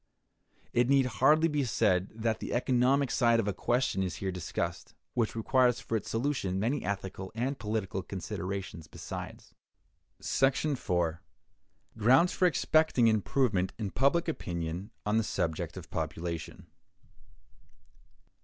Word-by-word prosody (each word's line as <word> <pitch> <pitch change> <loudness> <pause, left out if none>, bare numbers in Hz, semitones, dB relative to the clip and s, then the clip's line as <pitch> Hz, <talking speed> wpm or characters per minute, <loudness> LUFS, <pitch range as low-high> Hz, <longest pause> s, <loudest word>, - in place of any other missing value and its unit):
It 120 +1 +3
need 135 -1 +5
hardly 135 +8 +4
be 150 -3 0
said 105 -6 +1
that 110 0 -1
the - - -5
economic 130 +2 +2
side 115 -3 +3
of 110 - 0
a 100 - 0
question 120 0 0
is 90 -2 -2
here 95 -1 -3
discussed, 85 -1 -4 0.2
which 115 -2 0
requires 125 +2 +2
for 115 - -3
its 110 - -3
solution 115 -6 -1
many 120 +8 0
ethical 95 -1 -4
and 130 +4 -2
political 105 -3 -2
considerations 95 -2 -5
besides. - - -8 0.7
§ 135 +2 +1
4. 85 -1 -1 0.8
Grounds 130 +11 +5
for 185 - +3
Expecting 155 -7 +3
Improvement 110 -3 +1
in 105 -4 -3
Public 140 +7 +2
Opinion 85 - -4 0.2
on 105 +1 +2
the 115 - +2
Subject 80 -6 -2
of - - -10
Population. 85 -1 -4
110 Hz, 130 wpm, -30 LUFS, 95-130 Hz, 0.8 s, need